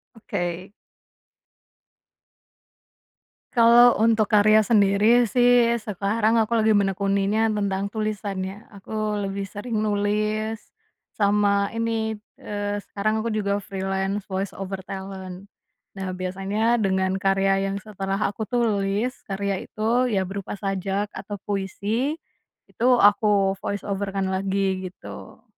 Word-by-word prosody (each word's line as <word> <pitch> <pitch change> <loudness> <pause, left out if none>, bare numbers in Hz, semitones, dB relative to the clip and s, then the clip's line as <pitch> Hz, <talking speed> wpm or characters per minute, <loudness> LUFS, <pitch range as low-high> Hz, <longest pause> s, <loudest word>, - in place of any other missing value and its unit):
Oke. 180 -2 -4 2.8
Kalau 240 -1 +6
untuk 220 -1 +3
karya 215 +1 +5
sendiri 215 +3 +4
sih 245 +1 +4
sekarang 215 +3 +1
aku 220 +1 0
lagi 220 -1 +3
menekuninya 200 +2 +1
tentang 200 -1 -1
tulisan 215 -2 -3
ya 200 +3 -8
aku 210 +1 -3
lebih 195 0 -4
sering 205 +4 -6
nulis, 215 +1 -1 0.5
sama 200 -1 +2
ini, 225 -1 -1 0.2
eee, 205 0 -3
sekarang 215 +2 -1
aku 230 - -2
juga 205 -2 0
freelance 195 +1 -3
voice 190 +1 -3
over 195 0 -5
talent 190 0 -8 0.4
nah 195 -1 -5
biasanya 195 +5 -1
dengan 190 -1 +1
karya 195 0 +2
yang 195 - -3
setelah 195 -1 -4
aku 210 +1 -2
tulis 220 0 0 0.2
karya 195 -1 -2
itu 240 +4 +1
ya 195 -3 0
berupa 200 +2 -6
sajak 195 0 -2
atau 205 - -6
puisi, 205 - -2 0.5
itu 240 - -2
aku 205 -2 +4
voice 205 -1 -4
over 200 0 -2
kan 195 0 -2
lagi 190 0 -1
gitu. 180 - -12
205 Hz, 115 wpm, -24 LUFS, 195-220 Hz, 2.8 s, Kalau